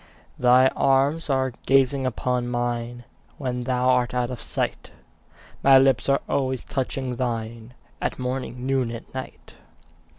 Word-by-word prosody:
Thy 125 Hz, +1 st, +5 dB
eyes 140 Hz, +4 st, +2 dB
are 130 Hz, -2 st, +1 dB
gazing 135 Hz, 0 st, +3 dB
upon 125 Hz, 0 st, -1 dB
mine 120 Hz, 0 st, -3 dB, 0.3 s
When 125 Hz, -3 st, -3 dB
thou 125 Hz, -1 st, 0 dB
art 125 Hz, -1 st, +2 dB
out 125 Hz, 0 st, 0 dB
of 125 Hz, -, -6 dB
sight; -, -, -3 dB, 0.7 s
My 135 Hz, -1 st, +7 dB
lips 130 Hz, -1 st, +3 dB
are 140 Hz, -, +3 dB
always 130 Hz, -2 st, -1 dB
touching 130 Hz, -1 st, -3 dB
thine 115 Hz, -1 st, -4 dB, 0.3 s
At -, -, -2 dB
morning, 125 Hz, -1 st, -4 dB
noon, 135 Hz, -3 st, +1 dB
and 115 Hz, 0 st, -7 dB
night. 130 Hz, 0 st, -8 dB
125 Hz, 135 wpm, -24 LUFS, 120-135 Hz, 0.7 s, My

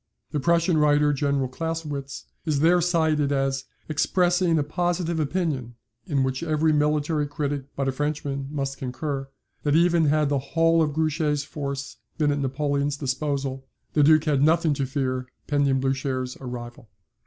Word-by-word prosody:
The 150 Hz, -, -1 dB
Prussian 170 Hz, +2 st, +2 dB
writer, 150 Hz, 0 st, +4 dB
General 140 Hz, -1 st, 0 dB
Clausewitz, 145 Hz, -1 st, -5 dB, 0.2 s
is 150 Hz, -3 st, 0 dB
there 175 Hz, +2 st, +5 dB
cited 160 Hz, -4 st, +2 dB
as 135 Hz, -1 st, 0 dB, 0.2 s
"expressing 175 Hz, +2 st, +2 dB
a 150 Hz, -, +2 dB
positive 170 Hz, +1 st, -1 dB
opinion, 145 Hz, -6 st, -2 dB, 0.3 s
in 140 Hz, -3 st, +1 dB
which 130 Hz, 0 st, -1 dB
every 155 Hz, -1 st, +2 dB
military 150 Hz, 0 st, +1 dB
critic 145 Hz, -1 st, -3 dB
but 135 Hz, -1 st, -1 dB
a -, -, +2 dB
Frenchman 140 Hz, -1 st, -3 dB
must 135 Hz, -2 st, -3 dB
concur, 135 Hz, +1 st, -4 dB, 0.3 s
that, 145 Hz, 0 st, +1 dB
even 170 Hz, -1 st, +4 dB
had 150 Hz, 0 st, +2 dB
the 140 Hz, -1 st, +1 dB
whole 165 Hz, +4 st, +2 dB
of 150 Hz, -2 st, +1 dB
Grouchy's 155 Hz, -1 st, 0 dB
force 140 Hz, -2 st, -5 dB, 0.2 s
been 150 Hz, -2 st, +2 dB
at 145 Hz, -, -1 dB
Napoleon's 140 Hz, +1 st, -1 dB
disposal, 135 Hz, -1 st, -2 dB, 0.3 s
the 150 Hz, -, +3 dB
Duke 155 Hz, +1 st, +6 dB
had 145 Hz, -4 st, +1 dB
nothing 160 Hz, +1 st, +3 dB
to 140 Hz, -1 st, -2 dB
fear 130 Hz, -2 st, -2 dB, 0.2 s
pending 140 Hz, -2 st, +2 dB
Blucher's 135 Hz, -1 st, -1 dB
arrival. 120 Hz, -3 st, -8 dB
145 Hz, 155 wpm, -25 LUFS, 135-155 Hz, 0.3 s, Duke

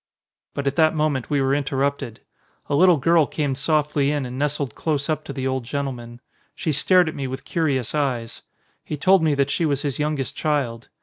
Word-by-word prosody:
But 140 Hz, -, -3 dB
at 140 Hz, 0 st, -1 dB
that 160 Hz, -1 st, +4 dB
moment 150 Hz, -5 st, 0 dB
we 145 Hz, -2 st, +1 dB
were 135 Hz, 0 st, +2 dB
interrupted. 140 Hz, -4 st, -1 dB, 0.5 s
A -, -, -2 dB
little 180 Hz, +3 st, +5 dB
girl 160 Hz, +2 st, +3 dB
came 145 Hz, -3 st, -1 dB
softly 145 Hz, 0 st, +1 dB
in 145 Hz, -2 st, -1 dB
and 125 Hz, +1 st, -6 dB
nestled 145 Hz, -3 st, -1 dB
close 150 Hz, -3 st, -2 dB
up 155 Hz, 0 st, -2 dB
to -, -, -6 dB
the 135 Hz, -1 st, -4 dB
old 130 Hz, -1 st, -1 dB
gentleman. 120 Hz, -2 st, -5 dB, 0.3 s
She 160 Hz, -, -1 dB
stared 180 Hz, +5 st, +4 dB
at 155 Hz, -, -3 dB
me 135 Hz, -1 st, -4 dB
with 130 Hz, +1 st, -6 dB
curious 140 Hz, -8 st, -1 dB
eyes. 130 Hz, -6 st, -2 dB, 0.4 s
He 150 Hz, -, -5 dB
told 190 Hz, +5 st, +4 dB
me 155 Hz, -2 st, +2 dB
that 140 Hz, 0 st, +1 dB
she -, -, 0 dB
was 145 Hz, -3 st, 0 dB
his 140 Hz, -2 st, -2 dB
youngest 150 Hz, -3 st, -2 dB
child. 135 Hz, -6 st, -1 dB
140 Hz, 200 wpm, -23 LUFS, 135-155 Hz, 0.5 s, little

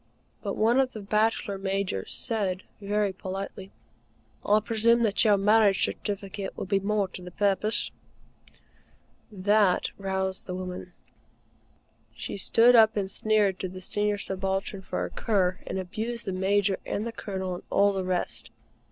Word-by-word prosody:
But -, -, -3 dB
one 230 Hz, +4 st, +3 dB
of 260 Hz, -1 st, +1 dB
the 220 Hz, -, -6 dB
Bachelor 210 Hz, 0 st, 0 dB
Majors 195 Hz, -, -2 dB
said 185 Hz, -, -1 dB, 0.2 s
very 205 Hz, 0 st, 0 dB
politely: 190 Hz, 0 st, -6 dB, 0.7 s
"I 210 Hz, +1 st, +4 dB
presume 230 Hz, +2 st, +2 dB
that 215 Hz, -2 st, +3 dB
your 210 Hz, -3 st, +5 dB
marriage 205 Hz, 0 st, +4 dB
certificate 200 Hz, -1 st, -4 dB
would -, -, -4 dB
be 195 Hz, -, +3 dB
more 200 Hz, 0 st, 0 dB
to 185 Hz, -, -8 dB
the 180 Hz, -, -8 dB
purpose?" 205 Hz, +3 st, +1 dB, 1.4 s
That 205 Hz, -1 st, +2 dB
roused 190 Hz, -1 st, -2 dB
the 180 Hz, -, -4 dB
woman. 180 Hz, -1 st, -6 dB, 1.2 s
She -, -, -5 dB
stood 235 Hz, +5 st, +5 dB
up 220 Hz, -1 st, +6 dB
and 195 Hz, -1 st, -1 dB
sneered 205 Hz, -3 st, +1 dB
at 185 Hz, -1 st, -4 dB
the 185 Hz, -, -7 dB
Senior 205 Hz, +2 st, -1 dB
Subaltern 195 Hz, 0 st, -2 dB
for -, -, -3 dB
a -, -, -7 dB
cur, 185 Hz, -5 st, 0 dB
and -, -, -3 dB
abused 220 Hz, +6 st, -4 dB
the 190 Hz, -, -2 dB
Major 195 Hz, +1 st, +1 dB
and 210 Hz, -, -3 dB
the 235 Hz, -, -3 dB
Colonel 190 Hz, -4 st, -4 dB
and 175 Hz, -, -7 dB
all 200 Hz, 0 st, +3 dB
the 190 Hz, -1 st, -2 dB
rest. 185 Hz, -1 st, -1 dB
200 Hz, 150 wpm, -27 LUFS, 190-215 Hz, 1.4 s, up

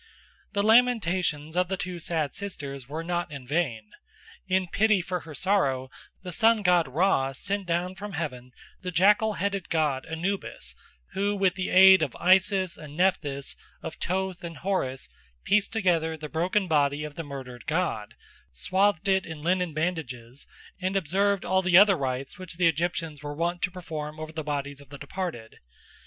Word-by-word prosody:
The 200 Hz, 0 st, +1 dB
lamentations 190 Hz, -9 st, +3 dB
of 180 Hz, 0 st, +2 dB
the 190 Hz, +1 st, -2 dB
two 180 Hz, -1 st, -4 dB
sad 160 Hz, -4 st, -2 dB
sisters 140 Hz, -10 st, -6 dB
were 160 Hz, +3 st, -4 dB
not 175 Hz, -1 st, -2 dB
in 140 Hz, -3 st, -8 dB
vain. 125 Hz, -8 st, -1 dB, 0.6 s
In 185 Hz, 0 st, +1 dB
pity 210 Hz, +2 st, +3 dB
for 180 Hz, +1 st, -3 dB
her 160 Hz, -3 st, -10 dB
sorrow 135 Hz, -10 st, +1 dB, 0.3 s
the 180 Hz, -, -6 dB
sun 225 Hz, +2 st, +4 dB
god 180 Hz, -4 st, +4 dB
Ra 135 Hz, -2 st, +1 dB
sent 195 Hz, +7 st, -3 dB
down 175 Hz, +2 st, 0 dB
from 200 Hz, +1 st, -8 dB
heaven 125 Hz, -6 st, -5 dB, 0.3 s
the 185 Hz, -, -4 dB
jackal 210 Hz, +5 st, +4 dB
headed 200 Hz, -1 st, -2 dB
god 150 Hz, -5 st, 0 dB
Anubis, 165 Hz, -, -3 dB, 0.4 s
who, 200 Hz, +1 st, 0 dB
with 195 Hz, -2 st, +2 dB
the 185 Hz, -1 st, -3 dB
aid 190 Hz, 0 st, +8 dB
of 145 Hz, -5 st, -1 dB
Isis 190 Hz, 0 st, +3 dB
and 150 Hz, 0 st, -10 dB
Nephthys, 145 Hz, -7 st, 0 dB, 0.3 s
of -, -, -5 dB
Thoth 190 Hz, 0 st, -2 dB
and 165 Hz, -2 st, -6 dB
Horus, 135 Hz, -7 st, -2 dB, 0.4 s
pieced 205 Hz, 0 st, +2 dB
together 170 Hz, -7 st, +1 dB
the 155 Hz, 0 st, -6 dB
broken 185 Hz, +5 st, 0 dB
body 145 Hz, -2 st, +2 dB
of 150 Hz, -1 st, -6 dB
the 165 Hz, -, -5 dB
murdered 130 Hz, -4 st, -9 dB
god, 155 Hz, -11 st, -1 dB, 0.4 s
swathed 185 Hz, -, +1 dB
it 190 Hz, -1 st, +2 dB
in 160 Hz, -2 st, -7 dB
linen 180 Hz, 0 st, +1 dB
bandages, 145 Hz, -7 st, -4 dB, 0.3 s
and 185 Hz, +1 st, -1 dB
observed 195 Hz, +2 st, +1 dB
all 190 Hz, +1 st, +2 dB
the 180 Hz, -2 st, +5 dB
other 200 Hz, 0 st, +7 dB
rites 135 Hz, 0 st, -3 dB
which 185 Hz, -3 st, -7 dB
the 180 Hz, -, +2 dB
Egyptians 165 Hz, -2 st, 0 dB
were 145 Hz, 0 st, -5 dB
wont 170 Hz, +2 st, -1 dB
to 180 Hz, -, +1 dB
perform 155 Hz, -4 st, -6 dB
over 155 Hz, 0 st, -6 dB
the 160 Hz, -1 st, -5 dB
bodies 145 Hz, -1 st, -4 dB
of 140 Hz, -, -17 dB
the 140 Hz, -, -9 dB
departed. 150 Hz, -11 st, -6 dB
170 Hz, 170 wpm, -27 LUFS, 145-190 Hz, 0.6 s, aid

